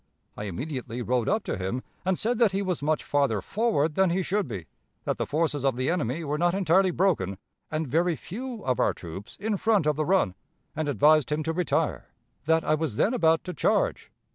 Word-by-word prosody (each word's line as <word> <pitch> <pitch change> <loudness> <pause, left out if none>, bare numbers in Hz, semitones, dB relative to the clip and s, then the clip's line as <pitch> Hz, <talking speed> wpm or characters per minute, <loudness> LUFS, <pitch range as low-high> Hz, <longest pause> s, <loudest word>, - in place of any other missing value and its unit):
I 105 - -5
immediately 125 - -4
rode 125 -1 0
up 215 +2 +1
to - - -3
him, 95 +7 -3 0.2
and 185 -1 +1
said 235 +1 0
that 225 -5 +4
he 195 +1 0
was 180 -5 -2
much 155 +1 0
farther 140 -7 +1
forward 180 - 0
than 190 +2 +3
he 185 +2 0
should 200 0 0
be; 100 -8 -6 0.4
that - - -1
the - - -2
forces 150 -2 0
of 135 -3 +2
the 130 +5 0
enemy 165 -2 -1
were 150 0 -2
not 175 +1 +2
entirely 190 0 +3
broken, 160 - +1 0.3
and 155 +1 -1
very 165 +5 +2
few 230 - -7
of 125 -1 0
our - - +2
troops 95 +7 -9
in 210 -1 -1
front 215 -5 +2
of 150 -1 +1
the 155 - 0
Run, 185 - +2 0.4
and 155 -1 -1
advised 150 +3 +4
him 155 +1 0
to 160 +1 -1
retire; 180 +1 0 0.4
that 160 +1 +3
I - - +2
was 155 -7 -1
then 215 - +2
about 165 -9 +3
to 180 - -5
charge.... - - 0
155 Hz, 215 wpm, -27 LUFS, 130-185 Hz, 0.4 s, that